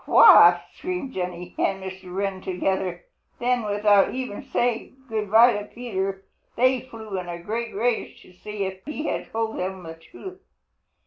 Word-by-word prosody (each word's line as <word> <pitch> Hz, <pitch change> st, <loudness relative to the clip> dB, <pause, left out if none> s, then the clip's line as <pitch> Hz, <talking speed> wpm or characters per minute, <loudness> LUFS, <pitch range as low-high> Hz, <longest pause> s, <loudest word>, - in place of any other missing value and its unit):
"What?" -, -, +8 dB
screamed 360 Hz, -8 st, -5 dB
Jenny 180 Hz, -1 st, -5 dB
and 195 Hz, 0 st, 0 dB
Mr. 190 Hz, -1 st, -8 dB
Wren 195 Hz, 0 st, -2 dB
together. 185 Hz, -1 st, -2 dB, 0.3 s
Then 245 Hz, 0 st, +1 dB
without 205 Hz, 0 st, +3 dB
even 255 Hz, -5 st, -4 dB
saying 240 Hz, +1 st, -1 dB
good 215 Hz, -3 st, -3 dB
by 230 Hz, +3 st, +7 dB
to 205 Hz, 0 st, -4 dB
Peter, 195 Hz, -5 st, -4 dB, 0.3 s
they 255 Hz, +1 st, +3 dB
flew 220 Hz, -6 st, -7 dB
in 180 Hz, -1 st, -7 dB
a 170 Hz, -, -4 dB
great 220 Hz, +6 st, -4 dB
rage 235 Hz, +3 st, -1 dB
to 185 Hz, -, -18 dB
see 210 Hz, +2 st, -5 dB
if 190 Hz, 0 st, -6 dB
he 300 Hz, +1 st, -5 dB
had -, -, -3 dB
told 225 Hz, 0 st, -2 dB
them 185 Hz, 0 st, -4 dB
the 165 Hz, -1 st, -7 dB
truth. 370 Hz, -, -12 dB
205 Hz, 165 wpm, -24 LUFS, 190-240 Hz, 0.3 s, What